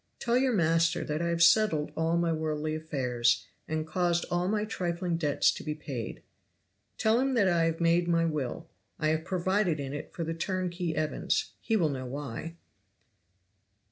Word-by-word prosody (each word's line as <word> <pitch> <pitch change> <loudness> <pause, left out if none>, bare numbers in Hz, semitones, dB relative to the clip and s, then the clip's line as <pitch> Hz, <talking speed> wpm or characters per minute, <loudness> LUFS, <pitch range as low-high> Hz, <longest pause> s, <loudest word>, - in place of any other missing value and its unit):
"Tell 235 0 0
your 260 +1 +3
master 165 -1 +2
that 150 +2 -2
I 170 - 0
have 170 0 +2
settled 170 -4 +4
all 165 +1 +1
my 170 -1 +1
worldly 155 -1 -2
affairs, 125 -9 0 0.2
and 155 0 -2
caused 170 +1 0
all 175 +1 +1
my 210 +1 0
trifling 175 -4 -2
debts 150 -4 +2
to - - -7
be 150 0 -3
paid. 135 -7 -6 0.7
"Tell 220 +1 +3
him 265 0 +1
that 205 -5 +4
I 170 -2 +3
have 165 0 -1
made 170 +1 +3
my 165 -1 +3
will! 150 -6 -3 0.3
(I 155 - +1
have 160 0 0
provided 185 -2 +1
in 140 -1 -4
it 145 - -6
for 170 - -4
the 165 0 -2
turnkey 180 -1 -2
Evans 155 0 -1
he 225 - 0
will 170 -7 +3
know 130 -2 -4
why.) 145 +4 -6
165 Hz, 175 wpm, -29 LUFS, 155-175 Hz, 0.7 s, settled